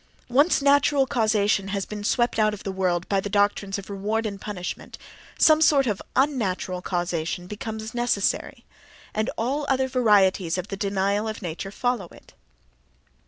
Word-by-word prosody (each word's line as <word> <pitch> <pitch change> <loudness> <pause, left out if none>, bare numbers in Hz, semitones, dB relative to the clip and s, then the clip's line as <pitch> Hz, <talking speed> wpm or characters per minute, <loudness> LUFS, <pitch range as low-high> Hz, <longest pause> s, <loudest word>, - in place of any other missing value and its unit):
Once 285 +4 +3
natural 280 0 +4
causation 215 -5 +1
has 195 0 -2
been 210 -1 -7
swept 240 +1 +1
out 215 -1 +3
of 200 - -13
the 195 - -3
world 180 -2 -1
by 195 - +1
doctrines 205 0 0
of 200 - -8
reward 210 +3 -2
and 200 -2 -5
punishment 185 -4 -6 0.4
some 310 0 +5
sort 290 -3 +5
of 210 -5 -1
un 275 0 +2
natural 185 -3 -2
causation 175 -1 -2
becomes 220 +2 -6
necessary: 240 -5 -1 0.5
and 215 +1 -1
all 270 +6 -1
other 265 -1 +2
varieties 200 -8 +3
of 185 +2 -5
the 195 - -3
denial 200 +1 0
of 215 -2 -5
nature 175 +3 -5
follow 245 +1 -2
it. - - -18
210 Hz, 160 wpm, -24 LUFS, 195-240 Hz, 0.5 s, some